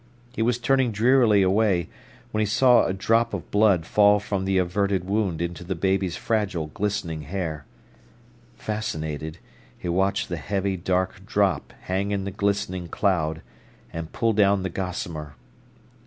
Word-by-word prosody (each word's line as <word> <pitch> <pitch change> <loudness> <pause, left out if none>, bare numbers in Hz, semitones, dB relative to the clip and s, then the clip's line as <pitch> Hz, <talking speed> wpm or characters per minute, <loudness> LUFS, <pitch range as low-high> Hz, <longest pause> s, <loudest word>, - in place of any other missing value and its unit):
He 115 - -3
was 120 +1 +2
turning 130 0 +2
drearily 110 -2 +4
away, 95 -2 +2 0.4
when 110 - -1
he 110 - +2
saw 125 +4 +5
a - - 0
drop 115 +4 +1
of 90 - -8
blood 100 -5 +3
fall 105 +2 +4
from 100 -2 -3
the 95 0 +1
averted 95 +1 +1
wound 95 -4 -1
into 85 +1 -5
the 95 +1 -3
baby's 95 0 0
fragile, 95 -9 -1
glistening 100 -6 -2
hair. 80 -2 -4 0.9
Fascinated, 80 -7 -4 0.4
he - - -7
watched 95 +3 +1
the - - -4
heavy 100 0 -1
dark 95 +1 -1
drop 95 -7 +1
hang 95 +2 -2
in 100 -1 -1
the 100 - -4
glistening 100 -2 -1
cloud, 80 -4 0 0.5
and 80 -1 -5
pull 115 -1 +1
down 100 -2 +3
the 95 - -3
gossamer. 85 -5 -5
95 Hz, 150 wpm, -24 LUFS, 85-105 Hz, 0.9 s, saw